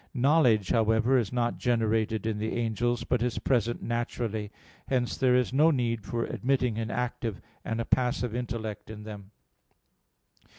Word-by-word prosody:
Knowledge, 125 Hz, -, +3 dB
however, 110 Hz, +2 st, +3 dB
is 110 Hz, -5 st, -2 dB
not 120 Hz, -1 st, -1 dB
generated 110 Hz, -2 st, +1 dB
in 110 Hz, -2 st, -1 dB
the 110 Hz, +1 st, -2 dB
angels, 120 Hz, +1 st, 0 dB
but 125 Hz, -, 0 dB
is 120 Hz, -1 st, -1 dB
present 120 Hz, -2 st, 0 dB
naturally. 115 Hz, -3 st, -2 dB, 0.4 s
Hence 125 Hz, -2 st, 0 dB
there 130 Hz, -2 st, +3 dB
is 125 Hz, 0 st, +1 dB
no 150 Hz, +4 st, +5 dB
need 120 Hz, -6 st, 0 dB
for 115 Hz, +3 st, -2 dB
admitting 125 Hz, -3 st, 0 dB
an 110 Hz, -1 st, -3 dB
active 120 Hz, -3 st, -3 dB, 0.2 s
and 115 Hz, 0 st, -3 dB
a 115 Hz, -, -1 dB
passive 125 Hz, -2 st, 0 dB
intellect 115 Hz, -4 st, -4 dB
in 105 Hz, -1 st, -8 dB
them. 105 Hz, -2 st, -9 dB
115 Hz, 155 wpm, -28 LUFS, 110-125 Hz, 0.4 s, no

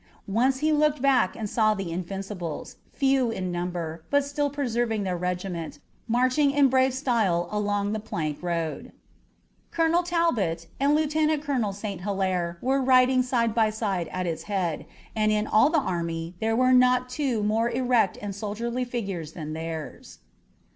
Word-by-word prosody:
Once 255 Hz, +6 st, +1 dB
he 310 Hz, +1 st, +2 dB
looked 300 Hz, -1 st, +2 dB
back 260 Hz, -8 st, +3 dB
and 220 Hz, -, -4 dB
saw 215 Hz, 0 st, +2 dB
the 195 Hz, -4 st, -4 dB
Invincibles, 185 Hz, -1 st, -5 dB
few 270 Hz, -3 st, +2 dB
in 185 Hz, -5 st, -3 dB
number, 175 Hz, -2 st, -4 dB
but 285 Hz, -1 st, +2 dB
still 285 Hz, 0 st, -1 dB
preserving 240 Hz, -6 st, -1 dB
their 185 Hz, -2 st, -1 dB
regiment, 180 Hz, -1 st, -4 dB, 0.3 s
marching 255 Hz, +5 st, +3 dB
in 280 Hz, -1 st, +4 dB
brave 260 Hz, +1 st, +3 dB
style 225 Hz, -10 st, +1 dB
along 205 Hz, -1 st, 0 dB
the 220 Hz, -, -2 dB
plank 155 Hz, -8 st, -4 dB
road. 170 Hz, -3 st, -3 dB, 0.8 s
Colonel 330 Hz, +1 st, +2 dB
Talbot 330 Hz, -, 0 dB
and 285 Hz, +2 st, +3 dB
Lieutenant 305 Hz, 0 st, +1 dB
Colonel 255 Hz, -9 st, 0 dB
St. 200 Hz, -2 st, -6 dB
Hilaire 185 Hz, -3 st, -1 dB
were 270 Hz, +2 st, +2 dB
riding 255 Hz, 0 st, +5 dB
side 240 Hz, -3 st, 0 dB
by 220 Hz, -1 st, +3 dB
side 200 Hz, -6 st, -2 dB
at 185 Hz, 0 st, -3 dB
its 165 Hz, -2 st, -3 dB
head, 180 Hz, -6 st, -2 dB, 0.3 s
and 215 Hz, -1 st, +2 dB
in 210 Hz, 0 st, +1 dB
all 220 Hz, +7 st, +4 dB
the 325 Hz, -, +2 dB
army 170 Hz, -, -2 dB
there 225 Hz, 0 st, 0 dB
were 255 Hz, +2 st, +4 dB
not 250 Hz, 0 st, +4 dB
two 250 Hz, -4 st, -1 dB
more 220 Hz, +3 st, +1 dB
erect 240 Hz, -5 st, +1 dB
and 205 Hz, -1 st, -5 dB
soldierly 230 Hz, +5 st, -3 dB
figures 195 Hz, -10 st, -4 dB
than 155 Hz, -2 st, -6 dB
theirs. 160 Hz, -1 st, -6 dB
220 Hz, 160 wpm, -26 LUFS, 180-260 Hz, 0.8 s, riding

